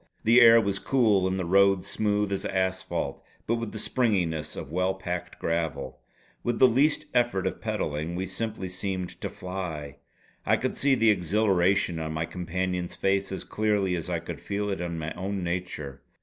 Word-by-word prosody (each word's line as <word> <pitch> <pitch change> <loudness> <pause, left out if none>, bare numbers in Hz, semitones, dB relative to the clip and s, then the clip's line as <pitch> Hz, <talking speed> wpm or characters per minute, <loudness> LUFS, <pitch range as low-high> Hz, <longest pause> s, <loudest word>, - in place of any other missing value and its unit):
The 120 +3 +6
air 115 0 +9
was 100 -3 0
cool 110 -8 +3
and 95 0 -1
the 95 - -2
road 95 +1 +4
smooth 105 -1 0
as 100 - -2
asphalt, 95 0 -2 0.2
but 115 - +1
with 115 -2 -4
the - - -6
springiness 90 - 0
of 70 - -7
well 90 +2 +1
packed 90 -2 -5
gravel. 80 -5 -2 0.4
With 120 -1 -1
the 130 - +7
least 145 +5 +2
effort 120 -6 +2
of - - -3
pedalling 75 +3 -2
we 95 +2 -2
simply 105 0 -4
seemed 95 0 -4
to - - -2
fly. 90 -6 -6 0.5
I - - +3
could - - -2
see 140 -1 +3
the 115 -3 +4
exhilaration 95 -2 +2
on 80 -1 -3
my 80 +1 -1
companion's 90 +1 -3
face 95 0 0
as 95 - -4
clearly 105 -4 0
as 85 - -4
I - - 0
could - - -7
feel 105 +1 -2
it 95 - -3
in 85 -1 -3
my 80 0 -4
own 95 0 -3
nature. 85 -6 -4
95 Hz, 180 wpm, -27 LUFS, 85-105 Hz, 0.5 s, air